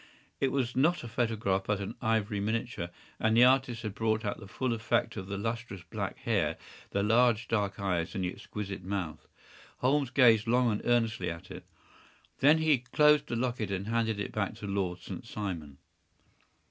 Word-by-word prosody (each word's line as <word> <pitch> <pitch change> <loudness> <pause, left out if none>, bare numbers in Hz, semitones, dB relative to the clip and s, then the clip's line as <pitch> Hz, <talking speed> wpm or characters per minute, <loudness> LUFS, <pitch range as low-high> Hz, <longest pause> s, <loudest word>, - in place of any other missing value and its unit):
It 135 - +1
was 125 -3 -1
not 155 +4 +2
a - - -6
photograph, 110 -5 0
but 105 -1 +1
an 100 +2 -4
ivory 110 -2 0
miniature, 110 -3 -2 0.3
and 110 0 +2
the 120 - +8
artist 125 -2 +3
had 105 -2 -3
brought 110 0 0
out - - -2
the 100 - -10
full 125 +4 -1
effect 115 +1 0
of 95 - -6
the 100 0 -4
lustrous 115 -3 -4
black 85 - -4
hair, - - 0 0.3
the 100 - 0
large 115 +1 +3
dark 105 -2 -1
eyes, 90 -4 -1
and 95 - -1
the 90 - -2
exquisite 100 -3 -6
mouth. 90 -5 -4 0.5
Holmes 135 +1 +2
gazed 120 -4 +5
long 120 0 +3
and 105 - -2
earnestly 115 -5 +1
at 85 -1 -8
it. - - -9 0.7
Then 150 +4 +6
he 155 -4 +3
closed 150 +5 +4
the - - -2
locket 120 -3 -1
and 100 +2 -3
handed 115 -2 0
it 105 - -3
back 100 -3 -2
to - - -8
Lord 95 -3 -1
St. - - -8
Simon. 85 -9 -5
110 Hz, 185 wpm, -30 LUFS, 100-120 Hz, 0.7 s, the